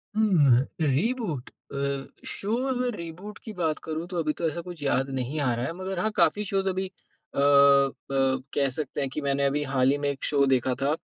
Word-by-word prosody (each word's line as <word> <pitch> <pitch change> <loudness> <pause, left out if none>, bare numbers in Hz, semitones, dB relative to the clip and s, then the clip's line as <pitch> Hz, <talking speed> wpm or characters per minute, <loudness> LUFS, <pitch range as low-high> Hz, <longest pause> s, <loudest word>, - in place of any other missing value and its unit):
हुँ, 170 - +5 0.2
अह - - +3
reboot 165 - -1
अ, 140 0 -4 0.2
show 210 +3 -2
अगर 250 -3 -1
reboot 175 +5 -8
की 220 - -7
बात 165 -5 -1
करूँ 160 +1 -4
तो 180 - -5
अभी 155 -1 0
तो 165 - -1
ऐसा 170 +2 -3
कुछ 175 -4 -8
याद 135 0 +1
नहीं 130 +4 -2
आ 130 -4 +2
रहा 120 +1 -2
है 165 - -3
मगर 185 0 -4
हाँ, 215 +4 0
काफ़ी 210 - +3
शोज 195 0 0
अभी 190 0 0
अ, 185 - -11
ब 140 -1 +4
कह 140 -1 +2
सकते 145 -1 -3
हैं 135 - -1
कि 150 - -3
मैंने 140 0 +1
अभी 145 +2 +1
हाल 130 -1 +3
ही 145 - +1
में 145 0 -1
एक 135 -1 -5
शो 140 -1 +3
देखा 130 0 +1
था, 145 +3 +2
145 Hz, 215 wpm, -26 LUFS, 140-185 Hz, 0.2 s, हुँ